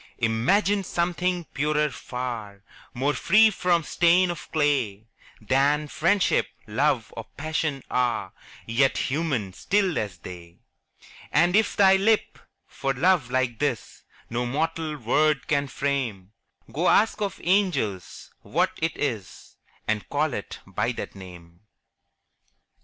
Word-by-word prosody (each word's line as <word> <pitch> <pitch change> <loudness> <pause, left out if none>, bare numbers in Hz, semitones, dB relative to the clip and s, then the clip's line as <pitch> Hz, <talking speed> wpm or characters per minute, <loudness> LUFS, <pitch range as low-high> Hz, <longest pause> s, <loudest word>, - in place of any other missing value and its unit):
Imagine 165 - +2
something 180 0 -1
purer 150 +1 +1
far, 115 -7 -6 0.3
More 140 +4 +1
free 215 +8 +5
from 180 -3 +1
stain 175 +3 +3
of 170 -3 -9
clay 135 -9 0 0.3
Than 140 +6 +1
Friendship, 175 +7 +2 0.2
Love, - - 0
or - - -6
Passion 155 -2 -2
are, 125 -1 0 0.3
Yet 130 +4 +2
human, 135 - -1
still 195 - +1
as 100 -5 -4
they: 85 -1 -11 0.7
And 175 +5 +3
if 220 0 +2
thy 195 -1 +6
lip, 215 +3 +1 0.3
for 135 -1 -3
love 165 -2 +2
like 130 -2 0
this, 140 -6 -2 0.3
No 120 +1 -2
mortal 155 +3 -2
word 145 +4 +1
can 145 -1 +1
frame, 130 -10 -3 0.4
Go, 170 +5 +2
ask 215 0 +3
of 200 -3 -2
angels 170 - 0
what - - 0
it 160 +1 -1
is, 110 -10 -4 0.3
And 110 -1 -1
call 145 -1 0
it 100 - -6
by - - -2
that - - -6
name! 85 -3 -13
145 Hz, 125 wpm, -25 LUFS, 115-175 Hz, 0.7 s, thy